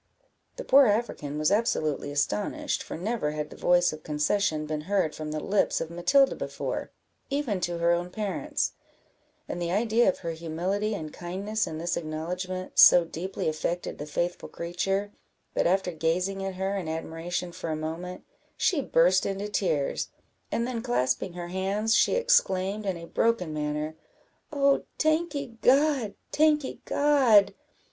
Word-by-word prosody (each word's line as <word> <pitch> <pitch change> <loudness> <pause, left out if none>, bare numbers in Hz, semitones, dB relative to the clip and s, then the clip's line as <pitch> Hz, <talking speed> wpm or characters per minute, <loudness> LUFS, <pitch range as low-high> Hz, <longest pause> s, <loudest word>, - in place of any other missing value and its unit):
The - - -6
poor 275 - +6
African 205 -9 -1
was 155 +2 +2
absolutely 155 - 0
astonished, 210 - -1
for - - -6
never 185 -4 -2
had 150 0 -4
the - - -9
voice 175 -1 +3
of 155 - -9
concession 155 +2 0
been 150 0 -3
heard 190 -6 +1
from 155 0 -6
the 155 0 -3
lips 200 +5 +1
of 165 - -4
Matilda 180 +11 +3
before, - - -4 0.4
even 275 -9 -1
to 175 -1 -2
her 170 0 +2
own 175 +1 0
parents; 205 +1 -2 0.8
and 175 - -4
the 170 - -1
idea 225 +3 +3
of - - -1
her 165 - -1
humility 180 +6 -2
and 155 -5 -6
kindness 195 +5 -3
in 160 - -5
this 170 +2 -1
acknowledgment 180 +4 -4
so 175 - +9
deeply 175 +4 -4
affected 170 +3 -2
the 150 - -5
faithful 175 +4 -2
creature, 195 +4 -2 0.4
that, - - +2
after 185 0 +1
gazing 180 +4 -1
at 195 -1 -4
her 190 +2 -1
in 185 -4 -3
admiration 165 +2 -4
for 170 - -6
a 155 - -1
moment, 165 +4 -5 0.3
she 320 -6 +2
burst 180 -4 +3
into 200 +1 -3
tears, 165 -9 0 0.4
and 235 - 0
then 240 -2 -3
clasping 170 - 0
her 175 0 -6
hands, 195 +4 0
she - - +4
exclaimed, 215 - +2
in 185 -3 -1
a 170 - -8
broken 180 -4 0
manner 150 +1 -2 0.6
"Oh, 280 -2 +3 0.2
tankee 310 -7 0
God! 270 -5 +3 0.2
tankee 300 -2 +2
God! 245 -9 +4
185 Hz, 155 wpm, -27 LUFS, 165-215 Hz, 0.8 s, so